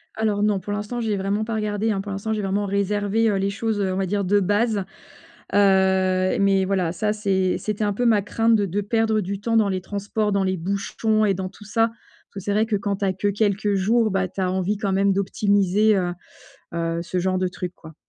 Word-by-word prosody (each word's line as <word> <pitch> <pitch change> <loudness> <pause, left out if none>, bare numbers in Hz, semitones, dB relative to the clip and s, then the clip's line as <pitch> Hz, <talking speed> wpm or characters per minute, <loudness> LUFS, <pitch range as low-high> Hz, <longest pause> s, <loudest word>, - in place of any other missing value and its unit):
Alors 210 -2 0
non. 210 -2 +2
Pour 205 +3 -5
l'instant, 210 +4 -3
j'y 225 -2 -1
ai 205 - 0
vraiment 200 +2 -1
pas 225 +1 -3
regardé, 210 0 -1
hein. 200 - -1
Pour 200 +1 -7
l'instant 200 +3 -3
j'ai 215 - -2
vraiment 200 +1 -1
réservé, 205 +2 +1
heu, 205 - +1
les 195 +1 0
choses, 210 +1 -2
heu, 190 -1 0
on - - -2
va 195 - 0
dire, 200 +2 -1
de 200 +2 +3
base. 205 +2 +1 0.7
Heu, 190 0 +3
mais 195 -1 +3
voilà, 185 -3 0
ça 210 +4 0
c'est 190 -3 0
c'était 215 0 -3
un 205 - 0
peu 245 +5 -1
ma 220 -3 +4
crainte 225 +3 +2
de 205 -2 +2
de 195 +2 -2
perdre 220 +1 +1
du 195 +1 -4
temps 230 +1 +1
dans 215 -2 +3
les 185 -1 -2
transports, 205 +2 -2
dans 200 -1 +2
les 185 0 0
bouchons 200 +4 0
et 200 - +2
dans 185 0 -4
tout 210 - -15
ça, 225 +2 +2
parce 230 - -27
que - - -4
c'est 200 +2 -2
vrai 215 +2 +2
que 220 - 0
quand 200 0 -2
tu 200 - -1
as 190 - +1
que 195 +2 -2
quelques 205 0 0
jours, 215 +3 +2
bah 190 -1 0
tu 190 - -10
as 185 -1 0
envie 190 +2 -1
quand 200 -2 -1
même 195 +1 +3
d'optimiser 200 +1 +2
heu 175 -2 -1 0.6
heu 165 0 -1
ce 180 +2 -3
genre 185 +1 0
de 185 0 0
truc, 180 0 -6
quoi. 160 -1 -13
200 Hz, 245 wpm, -23 LUFS, 190-215 Hz, 0.7 s, ma